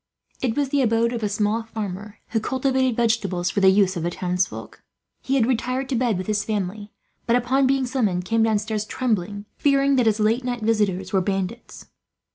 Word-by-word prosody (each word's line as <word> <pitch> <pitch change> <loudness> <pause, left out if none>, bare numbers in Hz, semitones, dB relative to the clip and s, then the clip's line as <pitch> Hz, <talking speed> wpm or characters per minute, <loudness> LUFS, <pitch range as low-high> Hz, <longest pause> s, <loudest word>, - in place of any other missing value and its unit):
It 245 -1 -1
was 285 -2 +1
the 285 0 +2
abode 230 0 +2
of 235 - -3
a 210 - 0
small 210 +2 0
farmer, 210 -2 -6
who 225 - 0
cultivated 260 +1 0
vegetables 205 -7 0
for - - 0
the 190 -1 +6
use 190 -1 +3
of 170 - -3
the 170 - -1
townsfolk. 180 +1 -3 0.4
He 270 - -1
had 250 -5 +3
retired 255 +2 -1
to 265 - 0
bed 235 -4 +1
with 185 - -4
his 215 0 0
family, 205 0 -3 0.4
but 235 - +3
upon 260 +2 +2
being 270 0 +2
summoned 210 -9 -1
came 225 +3 +1
downstairs 215 -1 0
trembling, 205 -5 -2
fearing 275 -1 +3
that 245 -3 +3
his 215 0 +2
late 220 +4 +2
visitors 215 -6 -1
were 190 - +3
bandits. 195 +4 -4
220 Hz, 190 wpm, -23 LUFS, 200-250 Hz, 0.4 s, the